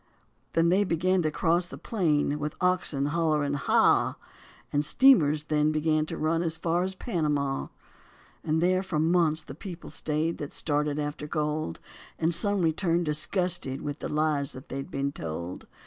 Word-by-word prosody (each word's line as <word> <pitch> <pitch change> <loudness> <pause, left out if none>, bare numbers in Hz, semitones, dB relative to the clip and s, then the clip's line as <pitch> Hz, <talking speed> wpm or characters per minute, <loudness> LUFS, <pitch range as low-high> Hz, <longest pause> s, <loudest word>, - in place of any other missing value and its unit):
They 165 - +3
then 185 +4 +3
began 185 +2 +2
to 155 - +1
cross 170 +3 +1
the - - -9
plain 150 -8 0
with 150 0 -3
oxen, 180 -6 +1
hollowing 150 -2 +1
"haw." 140 - +3 0.6
And 145 0 +2
steamers 155 - +5
then 150 0 +1
began 155 0 +1
to - - -5
run 165 +2 +1
as 165 -2 -1
far 170 +1 0
as 190 +1 -2
Panama. 150 - -1 0.8
And 160 +1 +1
there 185 +1 +3
for 190 -4 -3
months 160 -1 +2
the 135 - -9
people 175 +3 -9
staid, 155 +2 -2
that 145 - -6
started 150 -1 -1
after 150 0 -4
gold, 150 - -2 0.4
And 165 +1 +1
some 200 +2 +2
returned 170 +1 +1
disgusted 155 -2 -1
with 145 0 -4
the - - -4
lies 150 -2 0
that 130 - -11
had 135 0 -5
been 140 0 -2
told. 85 - -6
155 Hz, 165 wpm, -27 LUFS, 150-170 Hz, 0.8 s, steamers